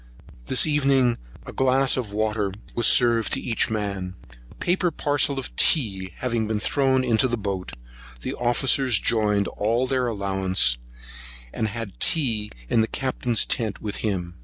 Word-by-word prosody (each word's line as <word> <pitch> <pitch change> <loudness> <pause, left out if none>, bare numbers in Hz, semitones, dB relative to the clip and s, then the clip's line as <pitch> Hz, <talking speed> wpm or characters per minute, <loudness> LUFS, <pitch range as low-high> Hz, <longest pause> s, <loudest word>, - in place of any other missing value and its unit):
This 130 - +4
evening 135 -5 +2 0.2
a - - -10
wine - - -21
glass 130 +1 +3
of 120 -6 -3
water 105 -1 -1 0.2
was 120 - +1
served 115 -3 +4
to - - 0
each 115 - 0
man. 100 -4 -3 0.3
A - - -17
paper 180 0 0
parcel 145 -3 0
of 135 - -6
tea 95 - +2
having 115 -3 -1
been 110 -1 -1
thrown 130 +2 +1
into 125 +1 +2
the 120 -1 -2
boat, 100 -3 -4 0.5
the - - -4
officers 125 0 +2
joined 105 -3 +1
all 115 +5 0
their 130 -1 0
allowance, 95 - 0 0.7
and 110 - -1
had 110 -2 -7
tea 115 -10 +2 0.2
in 115 - +2
the 110 - +1
Captain's 125 -3 -1
tent 110 -4 -2
with 105 -2 -4
him. 90 - -3
115 Hz, 160 wpm, -24 LUFS, 105-130 Hz, 0.7 s, This